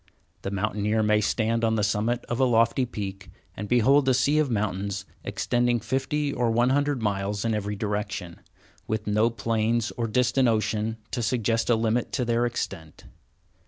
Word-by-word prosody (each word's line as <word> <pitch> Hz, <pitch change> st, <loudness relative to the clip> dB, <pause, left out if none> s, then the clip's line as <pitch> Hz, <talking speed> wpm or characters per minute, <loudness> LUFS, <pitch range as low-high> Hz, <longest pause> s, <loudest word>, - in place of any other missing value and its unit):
The -, -, -3 dB
mountaineer 105 Hz, +2 st, 0 dB
may 105 Hz, 0 st, +3 dB
stand 115 Hz, +2 st, 0 dB
on 110 Hz, 0 st, +2 dB
the 105 Hz, -, 0 dB
summit 110 Hz, +4 st, 0 dB
of 120 Hz, -, -3 dB
a -, -, +4 dB
lofty 115 Hz, +1 st, +3 dB
peak 95 Hz, -4 st, -6 dB, 0.3 s
and 105 Hz, -, -6 dB
behold 130 Hz, +3 st, +4 dB
a 130 Hz, -, +4 dB
sea 145 Hz, +4 st, +3 dB
of 150 Hz, -3 st, +1 dB
mountains 100 Hz, -2 st, -2 dB, 0.2 s
extending 120 Hz, 0 st, 0 dB
fifty 135 Hz, +5 st, -1 dB
or 120 Hz, -2 st, +1 dB
one 120 Hz, +3 st, +2 dB
hundred 145 Hz, -3 st, +1 dB
miles 100 Hz, 0 st, -1 dB
in 115 Hz, -, +1 dB
every 105 Hz, -1 st, -2 dB
direction, 105 Hz, -4 st, -3 dB, 0.5 s
with 110 Hz, -1 st, -2 dB
no 105 Hz, +2 st, +2 dB
plains 115 Hz, 0 st, 0 dB
or 115 Hz, -1 st, -1 dB
distant 125 Hz, +3 st, +2 dB
ocean 110 Hz, 0 st, 0 dB
to 120 Hz, -, -2 dB
suggest 115 Hz, -1 st, 0 dB
a 120 Hz, -, +5 dB
limit 115 Hz, +1 st, 0 dB
to 125 Hz, -, 0 dB
their 120 Hz, +1 st, +1 dB
extent. 90 Hz, -9 st, -5 dB
115 Hz, 170 wpm, -26 LUFS, 105-120 Hz, 0.5 s, a